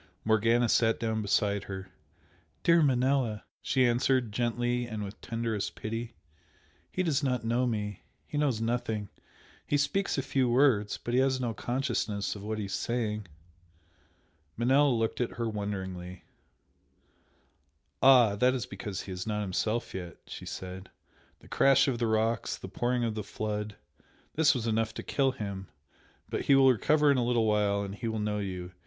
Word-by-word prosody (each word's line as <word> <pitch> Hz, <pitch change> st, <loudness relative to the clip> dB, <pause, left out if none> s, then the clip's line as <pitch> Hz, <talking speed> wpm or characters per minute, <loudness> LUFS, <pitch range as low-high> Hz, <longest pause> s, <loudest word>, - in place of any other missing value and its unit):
Morgana 115 Hz, +2 st, +3 dB
sat 115 Hz, 0 st, +3 dB
down 110 Hz, -1 st, -1 dB
beside 100 Hz, 0 st, +1 dB
her. 95 Hz, -1 st, -7 dB, 0.7 s
"Dear 170 Hz, 0 st, +5 dB
Manella" 130 Hz, -5 st, +2 dB, 0.2 s
she 130 Hz, -1 st, +2 dB
answered, 120 Hz, -1 st, +2 dB
gently 120 Hz, +2 st, 0 dB
and 110 Hz, -2 st, -4 dB
with 100 Hz, +1 st, -8 dB
tenderest 115 Hz, -3 st, -3 dB
pity 115 Hz, +1 st, -5 dB, 0.8 s
"He 185 Hz, -, -1 dB
does 155 Hz, -5 st, +1 dB
not 125 Hz, -5 st, -1 dB
know 120 Hz, +2 st, +1 dB
me. 105 Hz, -4 st, -3 dB, 0.2 s
He -, -, -8 dB
knows 135 Hz, -7 st, +1 dB
nothing! 115 Hz, -3 st, -2 dB, 0.6 s
He 145 Hz, -, +2 dB
speaks 190 Hz, +7 st, 0 dB
a 135 Hz, -, 0 dB
few 130 Hz, -2 st, +1 dB
words, 120 Hz, -5 st, +3 dB
but 120 Hz, -, -5 dB
he 125 Hz, -, +4 dB
has 130 Hz, -1 st, +2 dB
no 120 Hz, -3 st, -1 dB
consciousness 120 Hz, -5 st, -2 dB
of 100 Hz, -, -8 dB
what 110 Hz, +1 st, -3 dB
he 105 Hz, -, -3 dB
is 100 Hz, -, -6 dB
saying." 110 Hz, -4 st, -2 dB, 1.3 s
Manella 135 Hz, +5 st, +4 dB
looked 115 Hz, -1 st, 0 dB
at 120 Hz, -, -1 dB
her 115 Hz, -1 st, -2 dB
wonderingly 95 Hz, -4 st, -5 dB, 1.8 s
"Ah, 125 Hz, -6 st, +7 dB
that 125 Hz, +4 st, +3 dB
is 125 Hz, -, -2 dB
because 100 Hz, -1 st, -6 dB
he 95 Hz, -, -8 dB
is 90 Hz, +3 st, -5 dB
not 105 Hz, -1 st, -1 dB
himself 110 Hz, +4 st, -1 dB
yet" 90 Hz, -2 st, -6 dB
she -, -, -9 dB
said 95 Hz, 0 st, -7 dB, 0.5 s
"The -, -, -16 dB
crash 135 Hz, 0 st, +4 dB
of 125 Hz, -4 st, 0 dB
the 120 Hz, -, +1 dB
rocks 110 Hz, +1 st, 0 dB
the -, -, -8 dB
pouring 120 Hz, 0 st, 0 dB
of 115 Hz, -2 st, 0 dB
the 110 Hz, -, -3 dB
flood 105 Hz, 0 st, -4 dB, 0.6 s
this 150 Hz, -2 st, +4 dB
was 120 Hz, -3 st, -2 dB
enough 110 Hz, -1 st, 0 dB
to -, -, -5 dB
kill 135 Hz, -2 st, +1 dB
him 100 Hz, -5 st, -5 dB, 0.6 s
but -, -, -3 dB
he 140 Hz, -, +6 dB
will 135 Hz, -1 st, +7 dB
recover 150 Hz, +5 st, +3 dB
in 140 Hz, -, +3 dB
a -, -, +1 dB
little 120 Hz, -1 st, +2 dB
while 105 Hz, -1 st, +2 dB
and 100 Hz, -1 st, -5 dB
he 110 Hz, +3 st, -5 dB
will 110 Hz, 0 st, -2 dB
know 105 Hz, 0 st, -1 dB
you! 90 Hz, -3 st, -5 dB
115 Hz, 170 wpm, -29 LUFS, 105-125 Hz, 1.8 s, Ah